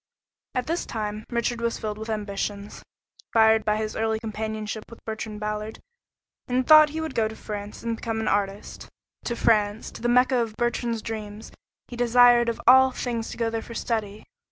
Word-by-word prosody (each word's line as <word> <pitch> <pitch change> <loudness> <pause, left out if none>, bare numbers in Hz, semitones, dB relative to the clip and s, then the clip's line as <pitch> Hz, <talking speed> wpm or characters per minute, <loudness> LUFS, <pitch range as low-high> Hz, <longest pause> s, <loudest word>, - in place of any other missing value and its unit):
At 250 -1 0
this 335 +4 -2
time 215 -1 -4
Richard 235 0 -1
was 235 0 -1
filled 215 -1 -5
with 220 +1 -6
ambitions, 205 -1 -4 0.5
fired 220 -1 +5
by 210 0 +1
his 215 0 -3
early 220 0 0
companionship 220 -1 -4
with 230 - -14
Bertrand 220 -1 -5
Ballard, 210 +1 -4 0.7
and 255 +1 0
thought 310 +1 +8
he 315 +2 -5
would 320 -3 -4
go 225 -2 +1
to 220 - -8
France 205 0 -7
and 230 -1 -2
become 225 -1 -3
an 220 - -2
artist; 200 0 -2 0.4
to 235 - -2
France, 215 -1 +1
the 240 - -3
Mecca 250 +1 +4
of 225 -3 -2
Bertrand's 240 -1 -1
dreams 215 -1 -6 0.4
he 245 - -8
desired 240 0 +5
of 230 - -3
all 260 +2 +7
things 240 -3 -4
to - - -8
go 230 -1 0
there 225 0 -2
for 235 - -10
study. 215 -3 -3
225 Hz, 180 wpm, -25 LUFS, 215-240 Hz, 0.7 s, thought